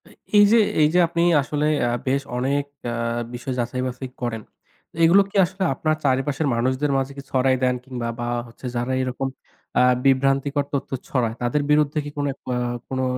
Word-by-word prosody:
এই -, -, -18 dB, 0.3 s
এই -, -, +9 dB
যে 230 Hz, -, +6 dB, 0.2 s
এই 150 Hz, -, +6 dB
যে 180 Hz, -, +4 dB
আপনি 170 Hz, 0 st, -1 dB, 0.2 s
আসলে 145 Hz, +2 st, -2 dB, 0.2 s
আ -, -, +1 dB, 0.2 s
বেশ 135 Hz, +2 st, +2 dB, 0.2 s
অনেক 140 Hz, +3 st, 0 dB, 0.2 s
অ্যা 120 Hz, -, -3 dB, 0.4 s
বিষয় 125 Hz, +2 st, -4 dB
যাচাই 120 Hz, +1 st, -2 dB
বাছাই 125 Hz, +1 st, -6 dB
করেন। 115 Hz, -2 st, -2 dB, 0.6 s
এগুলো 175 Hz, +5 st, +7 dB
কি -, -, -19 dB
আসলে 190 Hz, +2 st, -4 dB
আপনার 155 Hz, +3 st, 0 dB
চারিপাশের 135 Hz, +3 st, +1 dB
মানুষদের 130 Hz, +4 st, 0 dB
মাঝে 135 Hz, 0 st, -1 dB
কি -, -, -5 dB
ছড়াই 130 Hz, 0 st, +3 dB
দেন 125 Hz, 0 st, +3 dB
কিংবা 125 Hz, -3 st, -4 dB
বা 120 Hz, -, -2 dB, 0.2 s
হচ্ছে 115 Hz, +2 st, -13 dB
যারা 120 Hz, +2 st, -1 dB
এরকম 130 Hz, +1 st, -2 dB, 0.5 s
আ -, -, +5 dB, 0.2 s
বিভ্রান্তিকর 135 Hz, +1 st, +2 dB
তথ্য 140 Hz, -, -2 dB, 0.2 s
ছড়ায় 115 Hz, -4 st, 0 dB
তাদের 120 Hz, +5 st, +1 dB
বিরুদ্ধে 150 Hz, 0 st, +3 dB
কি -, -, -4 dB
কোনো 145 Hz, 0 st, 0 dB, 0.3 s
আ -, -, 0 dB, 0.3 s
কোনো, 130 Hz, 0 st, -1 dB
135 Hz, 180 wpm, -23 LUFS, 125-145 Hz, 0.6 s, এই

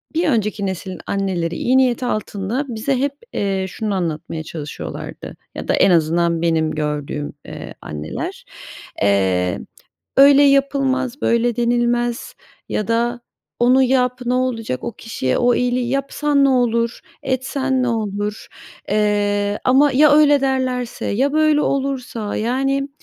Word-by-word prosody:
bir 335 Hz, 0 st, +2 dB
önceki 215 Hz, -5 st, 0 dB
nesilin 185 Hz, -1 st, -5 dB
anneleri 180 Hz, -4 st, -1 dB
iyi 255 Hz, +2 st, +2 dB
niyet 255 Hz, -2 st, +2 dB
altında 215 Hz, +2 st, -2 dB
bize 240 Hz, +4 st, -1 dB
hep, 280 Hz, +1 st, 0 dB, 0.2 s
eee, 195 Hz, -1 st, -1 dB
şunu 215 Hz, +1 st, -3 dB
anlatmaya 160 Hz, -2 st, -3 dB
çalışıyorlardı 155 Hz, -2 st, -7 dB, 0.2 s
ya -, -, -6 dB
da -, -, +2 dB
en -, -, +4 dB
azından 170 Hz, 0 st, +2 dB
benim 160 Hz, -2 st, +1 dB
gördüğüm, 150 Hz, -1 st, -3 dB
eee, -, -, -8 dB
anneler. 75 Hz, +1 st, -6 dB, 0.6 s
Eee, 95 Hz, -3 st, +2 dB, 0.6 s
"Öyle 280 Hz, +1 st, +8 dB
yapılmaz, 275 Hz, -1 st, +1 dB
böyle 235 Hz, 0 st, +2 dB
denilmez." 240 Hz, 0 st, 0 dB, 0.4 s
Ya 210 Hz, -, -2 dB
da 240 Hz, +1 st, 0 dB, 0.4 s
"Onu 250 Hz, +2 st, +5 dB
yap 250 Hz, -1 st, +1 dB
ne 245 Hz, -, +1 dB
olacak, 240 Hz, -, -1 dB
o 235 Hz, -, -3 dB
kişiye 195 Hz, -, -2 dB
o 245 Hz, 0 st, +3 dB
iyiliği 245 Hz, 0 st, 0 dB
yapsan 280 Hz, +2 st, +1 dB
ne -, -, +4 dB
olur, 235 Hz, -2 st, +1 dB, 0.2 s
etsen 265 Hz, 0 st, -1 dB
ne -, -, 0 dB
olur?" 210 Hz, -2 st, -3 dB, 0.4 s
Eee, 205 Hz, -1 st, +1 dB
ama 275 Hz, +3 st, +5 dB
"Ya 285 Hz, +2 st, +5 dB
öyle 290 Hz, -2 st, +5 dB
derlerse, 255 Hz, -2 st, -1 dB
ya 270 Hz, +7 st, +1 dB
böyle 310 Hz, -1 st, +3 dB
olursa?" 260 Hz, -7 st, -2 dB
Yani, 270 Hz, +4 st, 0 dB
240 Hz, 135 wpm, -20 LUFS, 195-265 Hz, 0.6 s, Öyle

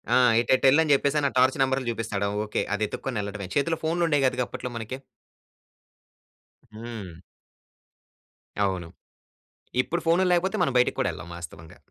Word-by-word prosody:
ఆ! -, -, +6 dB, 0.2 s
ఏటెటెల్లని 135 Hz, +5 st, +4 dB
చెప్పేసని, 140 Hz, +1 st, +2 dB
ఆ -, -, -15 dB
టార్చ్ 130 Hz, +1 st, +4 dB
నెంబరులు 130 Hz, -2 st, +1 dB
చూపిస్తాడా 105 Hz, -3 st, -2 dB, 0.2 s
ఓకే. 105 Hz, -, -2 dB
అది 105 Hz, -, -2 dB
ఎత్తుక్కొని 125 Hz, 0 st, -4 dB
యెళ్ళడమే. 100 Hz, -1 st, -6 dB
చేతిలో 165 Hz, +3 st, +1 dB
ఫోనులుండేయి 160 Hz, -3 st, +1 dB
కాదుగా 125 Hz, -1 st, -1 dB
అప్పట్లో 125 Hz, -, -6 dB
మనకి. 115 Hz, +3 st, -5 dB, 1.8 s
హ్మ్. 110 Hz, -7 st, -8 dB, 1.5 s
అవును. 90 Hz, -3 st, -3 dB, 0.9 s
ఇప్పుడు 170 Hz, +6 st, -3 dB
ఫోనుల్లేకపోతే, 180 Hz, +3 st, +2 dB
మనం 135 Hz, -, -2 dB
బయటికి 125 Hz, -, 0 dB
కూడా -, -, +1 dB
ఎళ్ళం 80 Hz, +2 st, -10 dB
వాస్తవంగా. 80 Hz, -1 st, -10 dB
130 Hz, 125 wpm, -26 LUFS, 105-145 Hz, 1.8 s, ఆ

